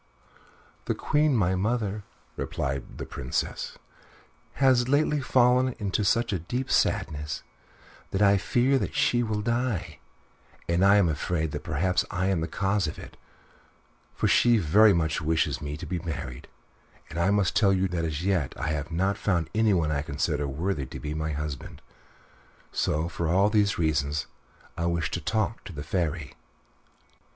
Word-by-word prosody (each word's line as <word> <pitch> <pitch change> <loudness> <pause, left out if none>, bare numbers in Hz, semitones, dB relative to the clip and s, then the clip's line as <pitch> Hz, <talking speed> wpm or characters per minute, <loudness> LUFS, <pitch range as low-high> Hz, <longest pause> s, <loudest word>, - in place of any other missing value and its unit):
"The - - -1
Queen, 150 -2 +2
my 95 -3 +2
mother," 105 +1 -1 0.3
replied 70 -5 -4
the - - -5
Princess, 65 - -3 0.8
"has 130 -3 +3
lately 145 +1 +2
fallen 125 0 +3
into 105 0 -1
such 115 +2 +2
deep 125 +5 -2
sadness 75 0 0 0.7
that 95 - -2
I 100 -1 +5
fear 125 +7 +2
that - - -3
she 120 - +2
will 110 -3 -2
die; 115 -10 -1 0.7
and 85 +2 +2
I 100 +1 +6
am 100 -4 +4
afraid 80 0 -1
that - - -5
perhaps 90 +5 +1
I 95 -1 -1
am 90 -4 +1
the 80 - -2
cause 95 +1 0
of 75 - -5
it, - - -11 1.0
for - - +1
she 120 -1 +5
very 105 +4 +5
much 80 -3 0
wishes 80 +1 0
me 75 0 -4
to 85 - -7
be 85 +2 -3
married, 70 -7 -6 0.6
and 85 - -4
I 85 +3 +3
must 100 -2 +2
tell 100 -3 +4
you 95 0 +2
truly 90 -2 -2
that 80 - -1
as 80 +2 -4
yet 90 -9 0
I - - -2
have 75 0 -2
not 95 +4 0
found 85 -5 0
anyone 100 -8 +2
I 70 -2 0
consider 75 0 -1
worthy 75 0 -2
to - - -8
be 75 0 -4
my 80 0 -2
husband. 75 -2 -5 0.9
So 80 +2 0
for 85 -1 -3
all 95 +5 +3
these 105 -2 +2
reasons 75 -1 0 0.5
I 85 0 -1
wished 85 -1 -1
to - - -2
talk 110 0 -1
to - - -7
the 70 -1 -6
Fairy." 80 -4 -2
90 Hz, 165 wpm, -27 LUFS, 80-105 Hz, 1.0 s, I